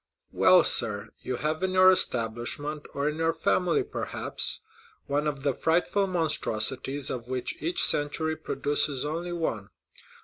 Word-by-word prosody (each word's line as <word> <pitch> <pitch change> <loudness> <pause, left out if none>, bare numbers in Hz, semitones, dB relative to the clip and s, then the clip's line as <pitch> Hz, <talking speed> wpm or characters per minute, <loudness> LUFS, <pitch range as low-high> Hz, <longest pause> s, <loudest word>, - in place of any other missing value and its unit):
"Well, 185 -1 +5
sir, 105 -2 +5
you 130 - -4
have 155 +5 -2
in 190 0 -1
your 185 0 +7
establishment, 135 0 -1
or 140 +1 -1
in 150 +1 -2
your 165 0 0
family, 180 - +1
perhaps, - - -3 0.4
one 145 +2 -1
of 140 -2 -4
the 140 -2 +1
frightful 175 +7 0
monstrosities 135 - 0
of 120 -2 -6
which 130 -1 -4
each 170 +3 0
century 160 +2 +1
produces 145 -3 -2
only 165 +4 -4
one. 115 -12 -3
150 Hz, 140 wpm, -27 LUFS, 130-165 Hz, 0.4 s, your